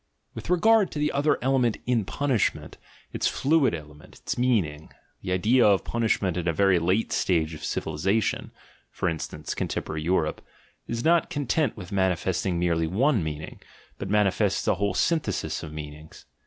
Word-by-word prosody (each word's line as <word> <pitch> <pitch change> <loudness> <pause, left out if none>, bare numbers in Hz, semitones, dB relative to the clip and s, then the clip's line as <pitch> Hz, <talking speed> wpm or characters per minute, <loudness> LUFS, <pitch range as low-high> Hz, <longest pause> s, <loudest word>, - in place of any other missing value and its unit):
With - - -8
regard 205 +3 +4
to - - -5
the 150 0 +1
other 145 +2 +2
element 130 -4 +2
in 120 -4 +1
punishment, 135 -1 -1 0.3
its - - 0
fluid 140 - +2
element, 75 -1 -12
its - - -4
meaning, 95 -12 0 0.3
the 90 - -4
idea 110 +8 +3
of 100 -2 +4
punishment 105 -6 0
in 90 -1 -2
a 85 - +2
very 95 +1 +3
Jate 90 +7 0
stage 80 -3 +1
of 80 - -9
civilisation 95 +8 -1 0.4
(for - - -3
instance, 80 -2 -4
contemporary 75 0 -3
Europe) 85 -1 0 0.5
is 115 0 -3
not 170 0 +3
content 145 -2 -1
with 90 -2 -9
man 95 -1 +2
ifesting 90 +1 -1
merely 85 -2 +1
one 110 - +2
meaning, 75 0 -6 0.4
but 100 - -5
manifests 105 -2 +1
a - - +4
whole 100 0 -1
syn 165 -1 +2
thesis 95 - -3
"of 80 - -8
meanings." 75 0 -10
95 Hz, 165 wpm, -26 LUFS, 80-125 Hz, 0.5 s, regard